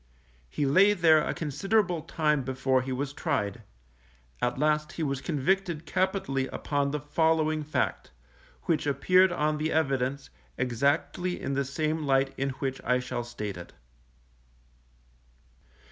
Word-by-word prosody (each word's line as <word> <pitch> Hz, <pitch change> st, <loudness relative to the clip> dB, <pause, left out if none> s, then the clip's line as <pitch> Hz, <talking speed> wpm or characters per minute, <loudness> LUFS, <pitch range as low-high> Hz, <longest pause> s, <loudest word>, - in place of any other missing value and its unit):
He 145 Hz, -, -1 dB
lay 190 Hz, +9 st, +5 dB
there 160 Hz, -5 st, +5 dB
a -, -, -1 dB
considerable 180 Hz, +3 st, 0 dB
time 150 Hz, -2 st, 0 dB
before 130 Hz, 0 st, 0 dB
he 130 Hz, +1 st, -5 dB
was 135 Hz, +2 st, -3 dB
tried; 140 Hz, -, -2 dB, 0.8 s
at 125 Hz, 0 st, 0 dB
last 150 Hz, +1 st, +1 dB
he 165 Hz, -, -3 dB
was 140 Hz, -2 st, -2 dB
convicted 170 Hz, +2 st, -1 dB
capitally 185 Hz, -9 st, 0 dB
upon 145 Hz, -1 st, -1 dB
the 150 Hz, +1 st, -2 dB
following 155 Hz, +1 st, +1 dB
fact, 150 Hz, -, -2 dB, 0.5 s
which 155 Hz, -3 st, 0 dB
appeared 180 Hz, +7 st, +4 dB
on 150 Hz, -2 st, 0 dB
the 155 Hz, +1 st, -1 dB
evidence, 135 Hz, -3 st, 0 dB, 0.3 s
exactly 140 Hz, +8 st, 0 dB
in 140 Hz, -, -3 dB
the 140 Hz, +1 st, +1 dB
same 155 Hz, +3 st, -1 dB
light 135 Hz, -2 st, +1 dB
in 135 Hz, +1 st, -1 dB
which 135 Hz, -1 st, -3 dB
I 125 Hz, +1 st, +2 dB
shall 125 Hz, -1 st, -4 dB
state 105 Hz, -5 st, -6 dB
it. 85 Hz, -, -10 dB
145 Hz, 135 wpm, -28 LUFS, 135-160 Hz, 0.8 s, lay